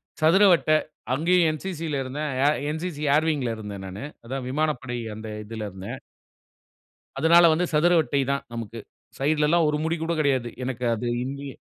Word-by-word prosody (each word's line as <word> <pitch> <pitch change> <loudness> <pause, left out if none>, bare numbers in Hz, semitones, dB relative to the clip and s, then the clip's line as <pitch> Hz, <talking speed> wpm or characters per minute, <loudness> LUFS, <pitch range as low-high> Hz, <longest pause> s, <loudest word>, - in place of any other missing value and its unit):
அ - - -17
சதுரவட்ட 175 0 +5 0.4
அங்கேயும் 170 +4 +3
என்சிசில 155 -2 -4
இருந்தேன். 145 +3 -4 0.4
NCC 160 0 -4
air wing 155 -2 +1
ல 115 - -1
இருந்தேன் 100 -3 -7
நானு. 95 +6 -7 0.2
அதான் 130 +2 -4
விமானப்படை 130 -3 -1 0.2
அந்த 110 +1 -8 0.2
இதுல 110 0 -5
இருந்தேன். 95 +1 -7 1.2
அதனால 170 +4 +6
வந்து 175 +3 +1
சதுரவட்டை 155 -4 +3
தான் 140 - -2
நமக்கு. 115 0 -6 0.4
சைடுல 150 +2 +2
ல்லாம் 170 0 +4
ஒரு 150 - +1
முடி 165 +1 0
கூட 165 +1 -1
கிடையாது. 130 -5 +1 0.2
எனக்கு 125 -1 -4
அது 115 +2 -4 0.2
இங்கயும் 140 +1 -6
145 Hz, 150 wpm, -25 LUFS, 125-160 Hz, 1.2 s, அதனால